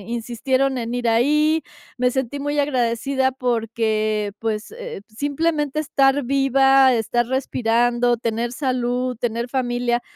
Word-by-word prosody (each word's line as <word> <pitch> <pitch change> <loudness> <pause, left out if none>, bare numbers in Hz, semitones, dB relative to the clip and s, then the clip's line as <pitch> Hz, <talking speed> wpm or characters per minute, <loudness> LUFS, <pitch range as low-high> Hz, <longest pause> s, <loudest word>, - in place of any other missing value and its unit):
insistieron 255 +3 -1
en 235 -1 -3
ir 245 -1 -1
ahí, 300 +7 +3 0.3
me 250 0 +2
sentí 265 +1 -3
muy 290 +1 -2
agradecida 265 -1 0
porque, 220 -4 -1
pues, 220 - -3
eh, 480 - -7
simplemente 295 +4 -1
estar 275 -1 +2
viva, 270 0 +4
estar 240 +1 0
respirando, 240 -2 +1
tener 235 0 -2
salud, 250 -1 -1
tener 235 +1 -2
familia. 245 -1 -1
245 Hz, 120 wpm, -21 LUFS, 235-275 Hz, 0.3 s, viva